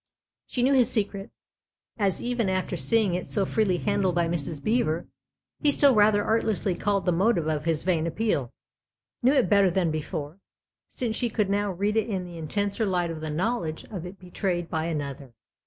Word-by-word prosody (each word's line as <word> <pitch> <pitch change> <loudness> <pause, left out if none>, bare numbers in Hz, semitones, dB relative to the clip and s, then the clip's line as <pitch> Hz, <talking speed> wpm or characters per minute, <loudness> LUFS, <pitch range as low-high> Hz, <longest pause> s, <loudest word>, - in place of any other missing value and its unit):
She 245 - -1
knew 270 +2 +4
his 255 -3 +4
secret, 200 -4 -1 0.7
as 200 -2 0
even 240 -4 0
after 185 0 -1
seeing 220 -5 +3
it 180 0 -3
so 200 -2 +1
freely 195 -3 +1
handled 200 -2 0
by 170 -1 +2
Mrs. 165 -2 -3
Beever 215 -8 0 0.6
he 295 - +3
still 280 -1 +5
rather 205 -1 +4
artlessly 215 -4 0
called 200 +1 -1
the 180 - +3
motive 180 0 +2
of 155 -1 -1
his 165 -2 0
vain 170 -3 +1
appeal; 165 - -1 0.7
knew 255 +3 +4
it 275 - +3
better 200 0 +4
than 175 -2 +1
before, 155 +1 -5 0.5
since 230 -3 -2
she 240 +1 0
could 210 -3 0
now 205 0 0
read 200 +4 -1
it 225 +1 +1
in 190 -3 -2
the 175 -1 -9
intenser 200 +7 -1
light 180 -4 0
of 160 -1 -7
the 155 - -4
knowledge 170 0 -2
of 180 -4 -5
it 190 +2 -10
betrayed 180 -1 -3
by 160 -1 -1
another. 140 -6 -5
190 Hz, 190 wpm, -26 LUFS, 165-215 Hz, 0.7 s, still